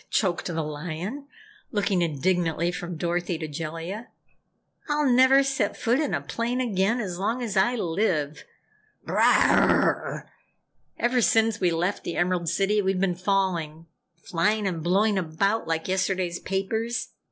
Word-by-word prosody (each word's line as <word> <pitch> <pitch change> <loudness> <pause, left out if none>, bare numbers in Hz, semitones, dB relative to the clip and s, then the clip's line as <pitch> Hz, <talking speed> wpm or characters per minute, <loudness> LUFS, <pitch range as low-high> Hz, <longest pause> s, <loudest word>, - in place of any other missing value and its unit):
choked 185 -5 0
the 165 -2 -2
Lion, 170 - -5 0.4
looking 195 -3 +1
indignantly 170 +1 0
from 175 -1 -6
Dorothy 175 +1 -1
to 155 - -5
Jellia. 165 - -6 0.8
"I'll 295 -1 +2
never 260 +2 +6
set 270 -6 -1
foot 240 +4 +1
in 300 -3 0
a - - -2
plane 235 +2 -2
again 225 -1 +1
as 185 -6 -4
long 230 +6 -1
as 215 -4 -3
I 200 +6 +3
live. 165 -7 -1 0.6
Brrrrah! - - +3 0.7
Ever 245 +1 +1
since 225 -1 +3
we 180 - +2
left 175 +4 -1
the 170 - -4
Emerald 175 -1 0
City 205 +4 +1
we've 190 -1 0
been 190 -1 +1
falling 175 -4 -1 0.3
flying 185 +5 0
and 175 -4 -2
blowing 195 +4 +2
about 195 +6 -1
like 165 0 -2
yesterday's 185 -2 -1
papers. 225 +5 -2
190 Hz, 140 wpm, -25 LUFS, 170-220 Hz, 0.8 s, never